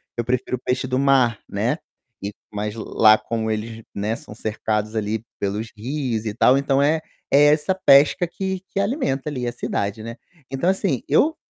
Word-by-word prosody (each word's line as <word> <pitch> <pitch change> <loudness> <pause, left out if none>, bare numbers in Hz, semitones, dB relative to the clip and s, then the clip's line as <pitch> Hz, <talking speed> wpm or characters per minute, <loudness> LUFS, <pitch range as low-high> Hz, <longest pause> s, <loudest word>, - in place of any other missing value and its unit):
eu 120 - -1
prefiro 125 +1 -1
peixe 130 +1 -1
do 130 - 0
mar, 130 -4 +3
né. - - -1 0.5
E, 100 +1 -4 0.2
mas 105 0 -3
lá 110 -1 +4
como 110 -1 -3
eles, 110 +1 -4
né, 105 +3 -2
são 105 - -11
cercados 110 0 -2
ali, 110 0 -2 0.2
pelos 105 +3 -3
rios 120 -1 -3
e 105 - -2
tal 125 +3 +4
então 140 0 +2
é 155 +3 +3 0.3
é 140 +2 +6
essa 175 +5 0
pesca 145 0 +5
que 190 +1 -4
que 195 - 0
alimenta 200 - -1
ali 125 -4 -4
a 120 - -1
cidade, 105 -3 -3
né. 115 +1 -7 0.3
Então 135 +7 0
assim, 190 - 0
eu 315 +2 +3
125 Hz, 175 wpm, -22 LUFS, 110-140 Hz, 0.5 s, é